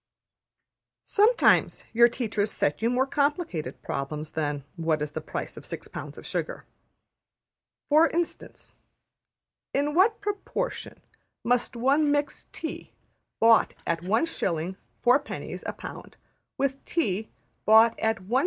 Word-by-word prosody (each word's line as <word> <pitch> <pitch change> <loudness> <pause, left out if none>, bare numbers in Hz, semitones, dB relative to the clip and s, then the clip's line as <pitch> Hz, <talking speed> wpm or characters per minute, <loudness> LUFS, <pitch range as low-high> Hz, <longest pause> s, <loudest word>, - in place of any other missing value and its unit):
Sometimes 435 +4 +4
your 235 +1 +7
teachers 220 -4 -2
set 145 +6 -1
you 230 - +2
more 250 +2 +2
complicated 285 - -1
problems 150 +3 -4
than: 145 -2 -2
What 165 -3 0
is 150 0 -3
the - - -4
price - - -6
of - - -9
six - - -7
pounds - - -8
of - - -10
sugar? - - -4 1.2
For 310 +3 +6
instance: 340 0 -4 1.0
In 290 +2 +1
what 395 +7 +4
proportion 415 +4 -4 0.4
must 245 +1 +1
one 275 +5 +3
mix 290 0 -1
tea 320 - -6 0.5
bought 225 -1 +5
at 165 0 -1
1s.\ 185 - 0 0.3
4d.\ 265 +4 +1
a - - -2
pound - - -10 0.4
with 275 0 -1
tea 220 - -1 0.4
bought 225 +1 +6
at 220 -3 0
1s. 235 +7 +1
240 Hz, 125 wpm, -27 LUFS, 185-295 Hz, 1.2 s, your